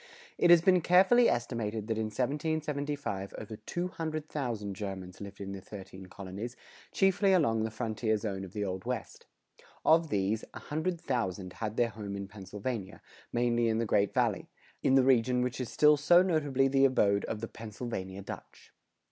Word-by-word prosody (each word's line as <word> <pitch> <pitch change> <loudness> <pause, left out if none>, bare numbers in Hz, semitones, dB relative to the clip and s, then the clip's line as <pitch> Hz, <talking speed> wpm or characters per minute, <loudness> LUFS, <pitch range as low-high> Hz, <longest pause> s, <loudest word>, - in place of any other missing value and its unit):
It 175 - +4
has 170 -1 +8
been 185 -1 +5
carefully 190 +8 +5
estimated 115 -3 -2
that 110 0 -2
in 110 - 0
1775 145 -3 -2
over 110 0 -7
200,000 150 - -3
Germans 95 -2 -6
lived 100 0 -8
in 100 -1 -5
the 100 -1 -6
thirteen 95 -1 -10
colonies, 100 +6 -7 0.4
chiefly 195 0 +3
along 115 -11 +3
the 110 - -1
frontier 110 -1 -1
zone 100 -3 -4
of 95 -1 -9
the 105 -1 -2
Old 95 -1 -4
West. - - -5 0.6
Of 160 0 +5
these, 105 +1 0
a - - -6
hundred 160 +3 -2
thousand 100 - -2
had 110 0 -4
their 120 -1 +3
home 105 -3 -6
in 100 0 -5
Pennsylvania, 100 +2 -6 0.3
mainly 120 -1 +2
in 110 -1 +1
the 115 - 0
Great 105 -2 +2
Valley, - - 0 0.3
in 135 - +3
the 135 - +6
region 125 -1 +3
which 125 +1 -2
is 125 - -4
still 150 0 +5
so 175 +5 +6
notably 145 -7 +2
the 135 0 +4
abode 100 -6 +3
of 110 - -4
the 115 - -4
"Pennsylvania 105 -4 -6
Dutch." - - -10
115 Hz, 170 wpm, -31 LUFS, 100-145 Hz, 0.6 s, has